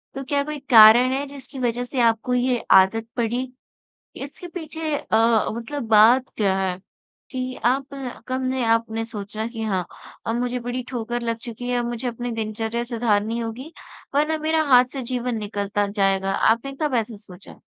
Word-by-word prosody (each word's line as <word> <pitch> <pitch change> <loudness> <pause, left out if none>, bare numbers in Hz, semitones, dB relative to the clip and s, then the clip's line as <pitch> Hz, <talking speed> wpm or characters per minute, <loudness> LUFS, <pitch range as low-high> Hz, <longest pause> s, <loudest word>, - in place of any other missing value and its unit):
तो 270 - -4
क्या 280 +1 0
कोई 300 0 -5
कारण 235 +2 +8
है, 275 +2 -1
जिसकी 275 -1 -10
वजह 245 -1 -1
से 250 +1 -4
आपको 230 +1 +2
ये 250 0 +2 0.2
आदत 220 +4 +3
पड़ी? 240 +2 -1 0.7
इसके 285 +6 -8
पीछे 320 -3 -4
अ, 225 -3 +2
मतलब 235 +6 -5
बात 230 +4 +6
क्या 195 -3 +1
है 185 -1 -1 0.5
कि 255 -1 -4
आप 260 +3 +2 0.4
कब 260 +1 -2
ने, 255 -1 -1
आपने 225 0 +1
सोचा 215 -1 -6
कि 230 -1 -6
हाँ, 190 -5 -1 0.4
अब 225 - 0
मुझे 250 0 -1
बड़ी 245 +1 -4
ठोकर 240 -1 -3
लग 230 -1 -1
चुकी 240 +1 -7
है, 245 0 +1
अब 240 - -1
मुझे 240 +1 -3
अपने 240 +1 -4
दिनचर्या 225 +1 -3
सुधारनी 225 -2 0
होगी, 235 +7 -6 0.4
वरना 305 +2 +2
मेरा 315 +1 +1
हाथ 250 0 +8
से 270 - -4
जीवन 245 -1 -1
निकलता 205 -1 -2
जाएगा। 195 -1 0
आपने 235 +5 +1
कब 295 -4 0
ऐसा 225 -1 -1
सोचा? 200 -2 -15
235 Hz, 175 wpm, -23 LUFS, 220-255 Hz, 0.7 s, कारण